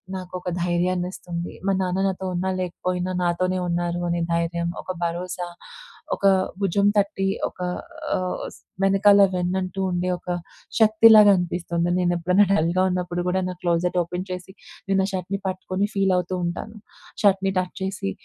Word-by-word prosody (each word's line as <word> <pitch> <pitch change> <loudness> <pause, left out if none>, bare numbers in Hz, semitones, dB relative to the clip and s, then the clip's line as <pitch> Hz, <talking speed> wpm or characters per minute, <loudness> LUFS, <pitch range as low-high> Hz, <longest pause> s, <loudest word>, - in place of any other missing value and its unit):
నాకొక 180 0 -5
ధైర్యాన్నిస్తుంది. 175 0 -2
మా - - +3
నాన్న 185 +1 -1
నాతో 190 0 -3
ఉన్నా, 185 +2 -1
లేకపోయినా 180 +1 -2
నాతోనే 185 +2 0
ఉన్నారు 175 0 -1
అనే 170 0 0
ధైర్యం, 170 0 -1
ఒక 185 - -4
భరోసా 175 +1 -3 0.7
ఒక 200 - +1 0.3
భుజం 200 +1 +2
తట్టి 195 -1 +1 0.2
ఒక - - -14 0.6
ఆహ్, 185 0 -2
స్ - - -18 0.2
వెనకాల 200 +1 +5
వెన్నంటూ 185 +1 -2
ఉండే 180 +1 -1
ఒక 180 - -11 0.5
శక్తిలాగా 215 -1 +7
అనిపిస్తుంది. 175 -1 -1
నేనేప్పుడైనా 180 +2 +3
డల్‌గా 175 +1 +2
ఉన్నప్పుడు 175 -1 -2
కూడా 190 +1 +1
నా - - -4
క్లోజెట్ 175 +1 +1
ఓపెన్ 180 +2 -5
చేసి 180 +1 -7 0.4
నేనా 190 -1 +3
షర్ట్‌ని 190 +1 -3
పట్టుకొని 185 +2 -2
ఫీల్ 195 -1 +2
అవుతూ 180 +1 -2
ఉంటాను. 215 +5 -5 0.5
షర్ట్‌ని 195 -1 +3
టచ్ 180 0 -4
చేసి. 190 - -3
180 Hz, 140 wpm, -23 LUFS, 175-190 Hz, 0.7 s, శక్తిలాగా